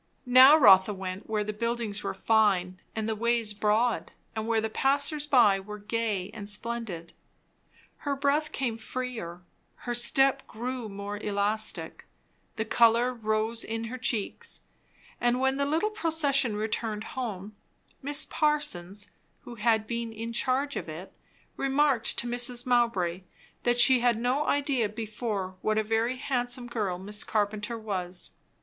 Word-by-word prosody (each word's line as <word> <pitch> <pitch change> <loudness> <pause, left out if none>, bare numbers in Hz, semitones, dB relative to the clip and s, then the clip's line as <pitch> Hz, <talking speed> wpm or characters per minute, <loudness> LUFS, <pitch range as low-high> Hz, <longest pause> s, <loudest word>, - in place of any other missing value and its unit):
Now 260 +4 +8
Rotha 200 -6 +6
went 190 +2 -6
where 215 -1 0
the 215 +1 -4
buildings 230 -1 -3
were - - -4
fine 195 -5 +2 0.2
and 220 -1 -2
the 220 - -1
ways 230 -1 +1
broad, 215 +3 +1 0.2
and 220 0 -3
where 230 -1 +2
the 220 - -1
passers 285 +5 +1
by 235 -9 +5
were 210 +2 -8
gay 210 -2 -2
and 205 -1 -5
splendid. 210 -6 -4 0.8
Her 285 -1 -2
breath 285 +2 0
came 240 -5 -2
freer, 225 -8 -5 0.3
her 240 - -5
step 270 +3 +3
grew 245 0 -5
more 200 +1 -6
elastic, 210 +1 -2 0.5
the 220 - -2
colour 235 +2 +4
rose 220 0 -1
in 225 +1 -4
her 255 - -6
cheeks; 225 -4 -2 0.6
and 240 +1 +1
when 265 +1 +1
the 280 0 0
little 325 +9 0
procession 290 - +1
returned 215 0 -2
home, 215 -5 -5 0.5
Miss 290 +2 +3
Parsons, 205 - -1 0.3
who 245 - -9
had 220 -1 +1
been 235 0 -4
in 225 +1 -6
charge 270 +4 0
of - - -5
it, 165 +5 -8 0.4
remarked 275 -3 +2
to - - 0
Mrs. 245 +1 -1
Mowbray 230 -8 +1 0.4
that 240 0 +1
she 255 +1 +7
had 240 -2 +2
no 255 +5 0
idea 275 -6 +1
before 210 -3 -4
what 215 0 0
a 220 - +2
very 225 +3 0
handsome 250 -2 -2
girl 210 -7 -2
Miss 205 +3 -3
Carpenter 210 +2 -1
was. 185 -5 -4
230 Hz, 145 wpm, -28 LUFS, 210-255 Hz, 0.8 s, Now